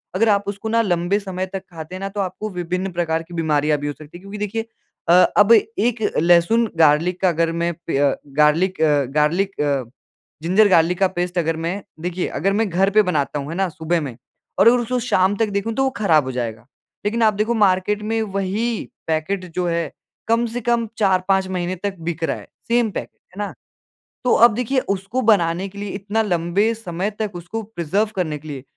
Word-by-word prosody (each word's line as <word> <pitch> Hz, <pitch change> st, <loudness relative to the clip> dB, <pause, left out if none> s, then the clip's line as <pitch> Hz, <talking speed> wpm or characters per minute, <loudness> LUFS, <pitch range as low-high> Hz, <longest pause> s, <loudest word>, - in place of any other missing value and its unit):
अगर 225 Hz, +4 st, +3 dB
आप 200 Hz, -1 st, +3 dB
उसको 200 Hz, +2 st, -4 dB
ना 230 Hz, +1 st, +3 dB
लंबे 180 Hz, 0 st, +1 dB
समय 190 Hz, -2 st, -4 dB
तक 190 Hz, -1 st, -4 dB
खाते 165 Hz, +1 st, -8 dB
हैं 185 Hz, -, -6 dB
ना 195 Hz, -, -4 dB
तो 205 Hz, +1 st, -6 dB
आपको 195 Hz, +3 st, -4 dB
विभिन्न 180 Hz, +1 st, -3 dB
प्रकार 165 Hz, -2 st, -1 dB
की 170 Hz, +1 st, -14 dB
बीमारियाँ 150 Hz, -2 st, +1 dB
भी 145 Hz, -, -4 dB
हो 145 Hz, -, -2 dB
सकती 155 Hz, +3 st, -13 dB
है। -, -, -14 dB
क्योंकि 195 Hz, +2 st, -8 dB
देखिए 210 Hz, +2 st, -3 dB, 0.4 s
अ, -, -, +7 dB, 0.2 s
अब 205 Hz, +2 st, +6 dB
एक 225 Hz, +1 st, +1 dB, 0.2 s
लहसुन 175 Hz, +7 st, +4 dB
गार्लिक 165 Hz, +3 st, +3 dB
का 190 Hz, -, +4 dB
अगर 165 Hz, 0 st, +1 dB
मैं 170 Hz, +1 st, -1 dB
पे 140 Hz, -, 0 dB, 0.4 s
गार्लिक 160 Hz, +4 st, +3 dB
अ, 150 Hz, -2 st, +3 dB, 0.2 s
गार्लिक 175 Hz, +5 st, +1 dB
अ, 140 Hz, -3 st, +1 dB, 0.6 s
जिंजर 195 Hz, +5 st, +4 dB
गार्लिक 175 Hz, 0 st, +3 dB
का 195 Hz, -, +4 dB
पेस्ट 180 Hz, 0 st, -3 dB
अगर 165 Hz, -1 st, +1 dB
मैं 170 Hz, +5 st, -3 dB, 0.2 s
देखिए 180 Hz, +1 st, -2 dB
अगर 195 Hz, +1 st, -1 dB
मैं 220 Hz, 0 st, +1 dB
घर 190 Hz, +3 st, +2 dB
पे 215 Hz, +1 st, +5 dB
बनाता 150 Hz, -6 st, -1 dB
हूँ, 140 Hz, +1 st, -6 dB
है 165 Hz, -, -4 dB
ना 195 Hz, 0 st, +1 dB
सुबह 165 Hz, +1 st, -1 dB
में 130 Hz, -6 st, -6 dB, 0.4 s
और -, -, +6 dB
अगर 240 Hz, +2 st, +7 dB
उसको 240 Hz, +1 st, -1 dB
शाम 200 Hz, -5 st, +2 dB
तक 225 Hz, -2 st, +1 dB
देखूँ 200 Hz, +3 st, -2 dB
तो 270 Hz, -, +1 dB
वो 265 Hz, -, +2 dB
खराब 165 Hz, -8 st, +3 dB
हो 130 Hz, -, -3 dB
जाएगा। 115 Hz, -2 st, -4 dB, 0.4 s
लेकिन 230 Hz, +3 st, 0 dB
आप 215 Hz, -1 st, +4 dB
देखो 215 Hz, +3 st, 0 dB
मार्केट 205 Hz, -1 st, +2 dB
में 225 Hz, +1 st, -1 dB
वही 205 Hz, +3 st, -2 dB, 0.2 s
पैकेट 165 Hz, +4 st, -1 dB
जो 180 Hz, -, 0 dB
है 170 Hz, -3 st, -1 dB, 0.4 s
कम 230 Hz, +1 st, +2 dB
से 235 Hz, +2 st, -4 dB
कम 235 Hz, 0 st, +1 dB
4-5 190 Hz, -1 st, +2 dB
महीने 180 Hz, -1 st, -2 dB
तक 200 Hz, -1 st, -2 dB
बिक 165 Hz, 0 st, -4 dB
रहा -, -, 0 dB
है, -, -, -11 dB, 0.2 s
सेम 235 Hz, -1 st, +2 dB
पैकेट -, -, -7 dB, 0.2 s
है -, -, -9 dB
ना? -, -, -7 dB, 0.7 s
तो 250 Hz, -, +3 dB
अब 235 Hz, -1 st, +6 dB
देखिए 250 Hz, +3 st, 0 dB
उसको 200 Hz, +6 st, -1 dB
बनाने 190 Hz, -4 st, +2 dB
के 200 Hz, -, -15 dB
लिए 205 Hz, 0 st, -4 dB
इतना 205 Hz, +3 st, -1 dB
लंबे 185 Hz, +4 st, +1 dB
समय 190 Hz, -3 st, -3 dB
तक 215 Hz, -2 st, -1 dB
उसको 175 Hz, +6 st, -5 dB
प्रिजर्व 205 Hz, +1 st, -1 dB
करने 160 Hz, -5 st, -1 dB
के 155 Hz, -, -13 dB
लिए 140 Hz, -3 st, -6 dB
185 Hz, 210 wpm, -21 LUFS, 165-210 Hz, 0.7 s, अ